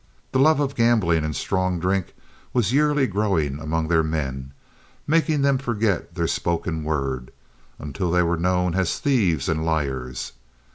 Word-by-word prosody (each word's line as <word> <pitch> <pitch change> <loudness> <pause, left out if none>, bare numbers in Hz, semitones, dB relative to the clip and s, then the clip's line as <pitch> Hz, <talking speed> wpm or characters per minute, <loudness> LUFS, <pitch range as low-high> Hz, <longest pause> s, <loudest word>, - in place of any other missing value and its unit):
The 130 - +1
love 155 +2 +5
of 140 -1 0
gambling 110 - +2
and 75 -1 -3
strong 95 -2 -1
drink 95 +1 -1 0.4
was 120 -2 +1
yearly 150 -1 +3
growing 95 - 0
among 80 +1 -2
their 80 0 +3
men, 70 -4 -3 0.5
making 155 -2 +2
them 140 -2 +3
forget 110 - -1
their - - 0
spoken 85 -2 -1
word, 70 -5 -2 0.5
until 85 +5 -3
they 90 +1 +3
were 85 0 +1
known 90 0 +1
as 95 -2 0
thieves 95 - +1
and 80 0 0
liars. 65 -6 -2
90 Hz, 150 wpm, -23 LUFS, 80-115 Hz, 0.5 s, love